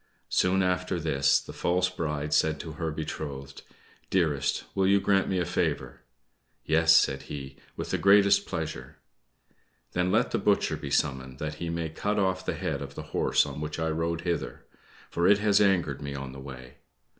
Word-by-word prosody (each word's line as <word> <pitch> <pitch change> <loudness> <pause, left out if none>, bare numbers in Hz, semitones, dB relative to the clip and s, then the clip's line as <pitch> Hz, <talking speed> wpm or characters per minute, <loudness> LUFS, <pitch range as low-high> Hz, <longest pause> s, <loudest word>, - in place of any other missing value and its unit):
Soon 95 +1 +2
after 90 0 0
this, 70 -4 +2
the - - -10
false 90 +1 +1
bride 75 -4 -3
said 80 -1 +2
to 80 - -6
her 80 +1 -3
betrothed, 70 -3 -6 0.5
"Dearest, 75 -7 +1
will 95 -1 +2
you 100 +1 +5
grant 95 -1 +2
me 95 - 0
a 90 - 0
favor?" 90 - -2 0.6
"Yes," 80 0 +4
said 70 -4 +4
he; 70 -2 -7 0.2
"with - - -4
the - - 0
greatest 100 0 +5
pleasure." 80 -4 -5 0.9
"Then 90 +1 0
let - - +2
the - - 0
butcher - - +2
be 70 - -6
summoned, 65 -2 -1
that 75 +2 -4
he 85 - -2
may 85 -1 -2
cut 100 +7 -2
off 95 -2 +1
the - - -2
head 70 - -3
of 70 0 -8
the - - -6
horse - - +3
on 75 - -6
which 75 0 -4
I 80 0 -1
rode 80 +1 -1
hither, 85 -8 -3 0.5
for 85 +1 +1
it 100 +1 +6
has 105 0 +3
angered 90 -9 +2
me 70 -1 -5
on 70 -1 -6
the 65 - -10
way." 65 -2 -10
80 Hz, 185 wpm, -28 LUFS, 70-90 Hz, 0.9 s, it